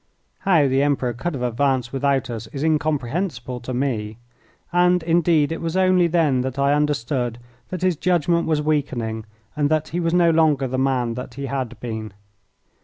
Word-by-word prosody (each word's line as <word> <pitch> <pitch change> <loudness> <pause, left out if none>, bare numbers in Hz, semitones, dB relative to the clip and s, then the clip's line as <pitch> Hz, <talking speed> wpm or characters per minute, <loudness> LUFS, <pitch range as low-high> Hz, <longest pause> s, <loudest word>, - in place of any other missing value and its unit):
How 170 -7 +3
the 135 +1 +2
Emperor 140 -4 +1
could 145 +7 -3
have 125 - -4
advanced 125 0 0
without 135 -1 0
us 115 -1 -6
is 140 +5 -5
incomprehensible 150 - -1
to 125 +1 -7
me, 115 -5 -2 0.6
and, 180 0 +3
indeed, 165 -2 +2
it 165 - -4
was 165 +2 -2
only 185 -2 +4
then 155 -6 +2
that 130 +1 -4
I 140 +1 +3
understood 135 -5 0 0.3
that 185 -1 -5
his 185 -4 +2
judgment 170 -1 +1
was 155 -2 +1
weakening 120 -8 -1 0.3
and 145 -1 +1
that 155 0 0
he 175 - -2
was 165 0 0
no 170 -1 +5
longer 155 -4 +3
the 130 +1 -2
man 130 -3 +1
that 125 0 -7
he 140 0 -4
had 130 -4 -4
been. 110 -4 -5
140 Hz, 180 wpm, -22 LUFS, 125-165 Hz, 0.6 s, no